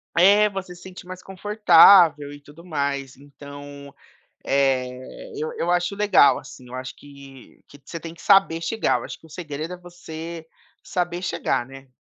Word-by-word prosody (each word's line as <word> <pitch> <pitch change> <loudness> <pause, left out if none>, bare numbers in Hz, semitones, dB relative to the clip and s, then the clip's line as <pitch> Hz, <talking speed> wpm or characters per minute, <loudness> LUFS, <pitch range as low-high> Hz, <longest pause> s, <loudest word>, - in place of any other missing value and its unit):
É, 205 +4 +5
você 190 -2 -7
se 175 - -16
sente 185 -1 -11
mais 185 0 -9
confortável 180 -6 +5
e 145 - -11
tudo 150 +4 -16
mais 140 -4 -3
então, 140 0 -12 0.5
eh, 135 - -2
eu 465 +2 -4
eu - - -1
acho 175 +2 0
legal, 205 -8 +4
assim, 125 -1 -13
eu 125 - -11
acho 130 0 -7
que 140 -2 -16
que 145 - -17
você 165 - -7
tem 165 +1 -9
que 165 - -16
saber 195 -5 +4
chegar, 220 +6 0
eu - - -9
acho - - -8
que 160 - -18
o - - -21
segredo 155 +1 -6
é - - -9
você 170 -2 -9 0.4
saber 175 -1 -3
chegar, 175 - -1
né? 135 0 -14
165 Hz, 175 wpm, -22 LUFS, 140-180 Hz, 0.5 s, É